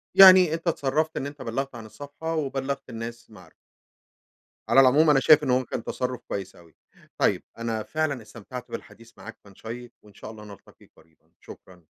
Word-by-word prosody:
يعني 185 -4 +9
أنتَ 165 +1 -5
اتصرفت 155 +1 0
إن - - -3
أنتَ 145 -1 -10
بَلّغت 130 +2 -4
عن 115 -2 -9
الصفحة 145 +7 -7
وبَلّغت 140 -2 -3
الناس 115 +1 -8
المعارف. 90 -6 -17 1.2
على 135 - +6
العموم 145 +4 +5
أنا 140 -2 +5
شايف 150 +3 +6
إنه 125 0 +2
هو 130 - -3
كان 115 - -5
تصرف 125 -1 -3
كويس 95 -2 -5
أوي. 85 -2 -19 0.4
طيب - - +1
أنا 115 -2 -3
فعلًا 155 -5 -2
استمتعت 115 +3 -10
بالحديث 115 0 -10
معاك 115 - -11
كان 100 -2 -18
شيِّق 120 +2 -9
وإن 105 -1 -19
شاء 110 - -10
الله 105 -1 -12
نلتقي 100 -1 -16
قريبًا 80 -2 -27
شكرًا. 90 -3 -15
125 Hz, 175 wpm, -25 LUFS, 110-145 Hz, 1.2 s, يعني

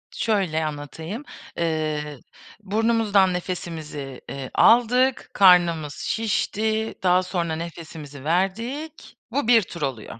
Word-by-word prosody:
Şöyle 185 -8 0
anlatayım, 160 - -6 0.3
eee, 155 -3 -2 0.4
burnumuzdan 210 -2 +2
nefesimizi, 160 -7 -5
eee, 135 -2 -6
aldık, 250 +2 +4
karnımız 170 -6 +5
şişti, 220 0 -1
daha 180 0 +4
sonra 170 -3 -2
nefesimizi 160 -4 -8
verdik, 230 - -2
bu 270 -1 -1
1 235 -2 +6
tur 170 -3 -9
oluyor. 125 -5 -4
180 Hz, 100 wpm, -23 LUFS, 155-220 Hz, 0.4 s, 1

